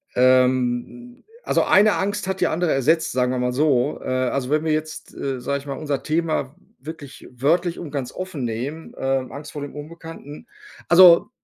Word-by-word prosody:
Ähm, 130 Hz, -, +1 dB, 0.2 s
also, -, -, +1 dB
eine 205 Hz, +2 st, +5 dB
Angst 195 Hz, 0 st, -2 dB
hat 190 Hz, -1 st, -3 dB
die 180 Hz, -, +4 dB
andere 170 Hz, +1 st, 0 dB
ersetzt, 155 Hz, +5 st, +1 dB
sagen 125 Hz, 0 st, 0 dB
wir 130 Hz, -, -2 dB
mal 125 Hz, 0 st, -1 dB
so. 140 Hz, -1 st, +1 dB
Äh, -, -, -8 dB
also, 130 Hz, 0 st, -1 dB
wenn 155 Hz, +1 st, +1 dB
wir 160 Hz, -, +1 dB
jetzt, 155 Hz, 0 st, -5 dB
äh, 135 Hz, -2 st, -3 dB
sage 140 Hz, +3 st, -2 dB
ich 140 Hz, -, -14 dB
mal, 140 Hz, -, -4 dB
unser 145 Hz, -3 st, -3 dB
Thema 155 Hz, -3 st, -1 dB, 0.2 s
wirklich 145 Hz, 0 st, -10 dB
wörtlich 165 Hz, +8 st, 0 dB
und 160 Hz, -5 st, -7 dB
ganz 130 Hz, -4 st, -4 dB
offen 185 Hz, -7 st, -5 dB
nehmen, 125 Hz, +8 st, -5 dB
äh, -, -, -11 dB
Angst 135 Hz, +2 st, -3 dB
vor 145 Hz, -, -7 dB
dem 145 Hz, 0 st, -7 dB
Unbekannten. 155 Hz, -1 st, -10 dB, 0.4 s
Also 175 Hz, -1 st, +7 dB
145 Hz, 185 wpm, -22 LUFS, 130-165 Hz, 0.4 s, Also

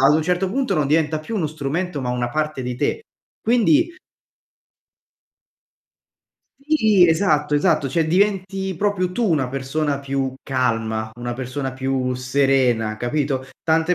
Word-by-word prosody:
ad 150 Hz, -, +6 dB
un 155 Hz, -, +2 dB
certo 180 Hz, +3 st, 0 dB
punto, 260 Hz, -4 st, 0 dB
non 150 Hz, -3 st, +1 dB
diventa 155 Hz, 0 st, +1 dB
più 215 Hz, +8 st, -5 dB
uno 165 Hz, -, 0 dB
strumento, 155 Hz, +2 st, -3 dB
ma 125 Hz, -1 st, -2 dB
una 125 Hz, -1 st, -1 dB
parte 150 Hz, 0 st, -2 dB
di 125 Hz, 0 st, -3 dB
te. 445 Hz, -, -1 dB, 0.4 s
Quindi 295 Hz, -, +3 dB, 2.6 s
Sì, 220 Hz, -, +4 dB
esatto, 155 Hz, -4 st, +2 dB
esatto, 150 Hz, -2 st, +2 dB
cioè, 160 Hz, +4 st, +1 dB
diventi 190 Hz, +1 st, 0 dB
proprio 185 Hz, -1 st, 0 dB
tu 230 Hz, +2 st, 0 dB
una 145 Hz, -5 st, +2 dB
persona 140 Hz, +2 st, -2 dB
più 135 Hz, -1 st, -2 dB
calma, 115 Hz, -4 st, -1 dB
una 120 Hz, 0 st, -4 dB
persona 130 Hz, +1 st, -4 dB
più 130 Hz, -1 st, -1 dB
serena, 125 Hz, -4 st, +1 dB
capito, 130 Hz, +3 st, -1 dB, 0.2 s
tante 160 Hz, +2 st, +2 dB
150 Hz, 140 wpm, -21 LUFS, 130-180 Hz, 2.6 s, ad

